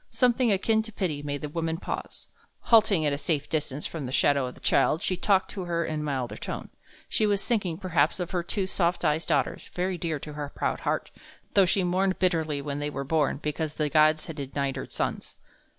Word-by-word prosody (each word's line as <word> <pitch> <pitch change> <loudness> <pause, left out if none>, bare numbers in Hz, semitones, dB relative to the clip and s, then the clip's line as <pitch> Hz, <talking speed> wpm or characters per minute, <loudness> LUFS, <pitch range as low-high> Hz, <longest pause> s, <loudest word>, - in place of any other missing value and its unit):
Something 245 -2 +3
akin 220 +3 +3
to 220 0 -8
pity 175 -9 -2
made 145 -1 -4
the 150 - -3
woman 165 +1 -2
pause. - - -6 0.4
Halting 215 -8 +5
at 145 - +2
a 140 - -2
safe 145 -1 -1
distance 150 -2 -2
from 150 -6 -4
the - - -5
shadow 140 -1 +3
of 125 - -8
the - - -15
child, 165 +6 +2
she 185 - +1
talked 190 +1 +2
to 190 -3 -5
her 170 -1 0
in 155 -1 -2
a - - -3
milder 135 -5 -2
tone. - - -5 0.4
She 215 - +2
was 205 -1 0
thinking, 195 -8 0
perhaps, 170 -4 +1
of 175 -1 -3
her 180 -2 0
two 190 +3 -2
soft 175 -2 0
eyed 155 +2 +1
daughters, - - 0
very 180 0 -1
dear 160 -2 -1
to 150 +1 -8
her 145 -1 -4
proud - - -1
heart, - - -2 0.4
though 195 -2 +5
she 190 +2 +2
mourned 185 +2 +1
bitterly 160 -6 +1
when 145 0 -3
they 145 0 -2
were 140 -1 -4
born, 150 0 +1
because 150 0 -2
the 150 -1 0
gods 155 0 +4
had 160 - -7
denied 140 -1 -2
her 135 - -5
sons. - - -3
160 Hz, 220 wpm, -27 LUFS, 145-185 Hz, 0.4 s, Halting